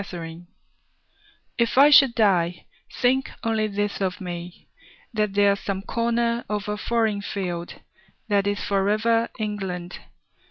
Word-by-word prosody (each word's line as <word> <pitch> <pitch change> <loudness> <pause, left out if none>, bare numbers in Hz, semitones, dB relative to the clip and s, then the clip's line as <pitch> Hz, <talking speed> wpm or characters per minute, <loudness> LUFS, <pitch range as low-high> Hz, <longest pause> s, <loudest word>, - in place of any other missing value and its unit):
The 200 - -9
Soldier 170 -1 -8 1.1
If 235 +1 +1
I 285 +2 +8
should 275 -5 +7
die, 180 -6 +2 0.3
think 260 +1 +1
only 220 -2 +1
this 205 0 -2
of 185 -2 -1
me: 175 -1 -7 0.5
That 210 -2 -1
there's 200 -1 +3
some 195 -1 -4
corner 235 +1 0
of 210 -1 -3
a 210 - -1
foreign 220 -1 0
field 180 -4 -4 0.5
That 200 -2 +1
is 205 0 -1
for 195 0 +1
ever 225 +2 +2
England. 190 -5 -4
205 Hz, 135 wpm, -24 LUFS, 190-230 Hz, 1.1 s, I